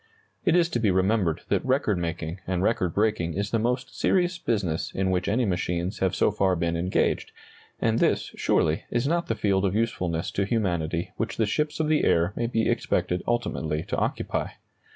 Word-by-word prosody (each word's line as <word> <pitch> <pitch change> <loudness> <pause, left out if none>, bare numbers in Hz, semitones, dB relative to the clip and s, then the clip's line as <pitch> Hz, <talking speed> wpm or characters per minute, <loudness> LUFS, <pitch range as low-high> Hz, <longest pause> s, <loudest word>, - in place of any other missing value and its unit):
It 170 - +4
is 175 -2 +4
to 120 - -1
be 110 -3 +2
remembered 95 -2 +1
that - - +1
record 130 -7 +1
making 85 +1 -4
and 90 0 0
record 95 -5 +1
breaking 100 -6 +1
is 100 +1 -2
the 115 - +2
most 125 +3 -1
serious 180 -1 +2
business 100 - -1
in 95 0 0
which 90 -1 0
any 115 +4 +2
machines 90 +1 -1
have 95 -1 +1
so - - +3
far 95 -2 +2
been 85 0 -1
engaged; 90 +3 0 0.5
and 115 0 +1
this, - - +1
surely, 80 0 +1
is 120 +3 0
not 170 +2 0
the 115 - 0
field 100 -3 +1
of 95 0 +1
usefulness 90 -7 -1
to 100 - 0
humanity 90 -5 -1
which 115 0 -3
the 110 - +2
ships 150 +10 -1
of 155 - +1
the 155 -1 +2
air 85 +3 +3
may 120 - -1
be 115 -1 0
expected 90 0 0
ultimately 80 -10 -1
to - - -3
occupy. - - -1
100 Hz, 195 wpm, -26 LUFS, 90-115 Hz, 0.5 s, It